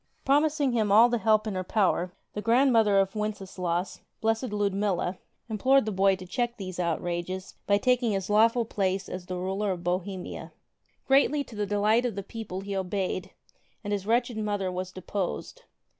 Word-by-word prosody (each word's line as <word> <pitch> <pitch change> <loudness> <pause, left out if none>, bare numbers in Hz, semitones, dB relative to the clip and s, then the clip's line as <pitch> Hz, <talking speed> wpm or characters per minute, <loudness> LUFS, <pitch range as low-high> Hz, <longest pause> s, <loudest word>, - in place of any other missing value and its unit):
Promising 290 0 +3
him 220 -4 +1
all 225 +4 +7
the 240 -1 0
help 215 +1 +3
in 215 - -2
her 185 0 -2
power, 185 -2 +1 0.2
the 210 - -4
grandmother 230 -3 +4
of 195 0 +2
Wenceslaus, 190 -4 -3 0.2
Blessed 225 +2 0
Ludmilla, 200 -3 0 0.3
implored 255 +4 +3
the 215 - -2
boy 195 0 +3
to 185 -1 -10
check 240 +5 -2
these 185 -3 -6
outrages 175 +2 -2
by 200 - +4
taking 245 0 +2
his 195 -1 -2
lawful 225 +3 +4
place 195 -3 -1
as 180 -1 -7
the 185 - -4
ruler 190 +3 -2
of 175 -2 -5
Bohemia. 180 +1 -4 0.5
Greatly 280 +2 +4
to 240 - -13
the 205 -1 -2
delight 210 +4 +2
of 225 - -5
the 200 - -4
people 200 -2 -6
he 200 0 -5
obeyed, 190 0 -2 0.5
and 205 -1 -2
his 200 -1 -3
wretched 240 0 +1
mother 205 -3 -1
was 185 0 -4
deposed. 195 - -5
205 Hz, 175 wpm, -27 LUFS, 185-225 Hz, 0.5 s, all